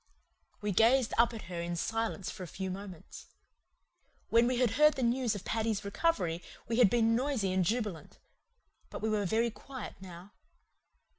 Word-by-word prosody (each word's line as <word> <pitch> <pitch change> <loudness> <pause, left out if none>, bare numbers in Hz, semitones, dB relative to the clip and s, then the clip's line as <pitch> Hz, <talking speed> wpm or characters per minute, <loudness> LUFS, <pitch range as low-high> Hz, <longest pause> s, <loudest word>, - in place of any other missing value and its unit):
We 210 0 -1
gazed 230 +5 +4
up 235 0 +5
at 225 -2 -7
her 175 -1 -5
in 170 0 -3
silence 225 +1 -2
for 205 - -10
a 180 - -5
few 190 +3 -5
moments. 190 -3 -9 1.0
When 230 +1 +5
we 250 0 0
had 245 -3 +2
heard 300 +6 +5
the 265 - -2
news 240 -1 +1
of 200 - -7
Paddy's 220 -2 -1
recovery 200 - 0 0.3
we 225 +1 -1
had 235 -5 +7
been 230 0 +3
noisy 240 -7 0
and 185 0 +2
jubilant; 210 -3 -2 0.7
but - - -7
we 220 - +1
were 210 -2 0
very 230 +4 +1
quiet 260 +3 -8
now. 180 +1 -11
220 Hz, 170 wpm, -31 LUFS, 190-240 Hz, 1.0 s, had